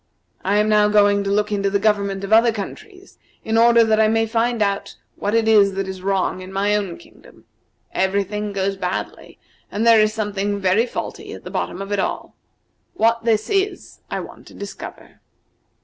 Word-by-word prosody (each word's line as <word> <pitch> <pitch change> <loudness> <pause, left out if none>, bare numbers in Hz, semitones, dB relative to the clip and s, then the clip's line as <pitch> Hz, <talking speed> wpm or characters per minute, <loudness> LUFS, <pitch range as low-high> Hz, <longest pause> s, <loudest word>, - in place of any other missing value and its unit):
I 200 +2 +1
am 210 +1 +2
now 210 -1 +4
going 205 -1 +3
to - - -1
look 210 +1 0
into 200 -1 0
the 200 - +1
government 200 -2 0
of 195 +2 -1
other 230 +1 +6
countries 375 - -9 0.3
in 220 - -1
order 235 0 +6
that 220 -1 +2
I 220 - +5
may 225 +1 +2
find 230 +1 0
out 200 0 -2 0.2
what 205 +2 -2
it 225 -1 +2
is 205 -3 +5
that 195 0 -2
is 190 -1 -7
wrong 190 -1 -1
in 185 +1 -9
my 200 +2 +1
own 195 -5 -3
kingdom. - - -19 0.5
Every 190 +1 +1
thing 210 +1 -4
goes 195 0 -2
badly, 180 -1 -5 0.3
and 215 +3 -1
there 230 -2 +7
is 215 0 +2
something 205 -2 -2
very 195 +5 +2
faulty - - -6
at - - -10
the - - -8
bottom 195 - -3
of 195 - -9
it 205 - 0
all. - - -3 0.6
What 230 +1 +1
this 220 -2 +1
is 390 -2 -2
I - - -3
want - - -12
to - - -14
discover." - - -9
210 Hz, 195 wpm, -21 LUFS, 195-225 Hz, 0.6 s, there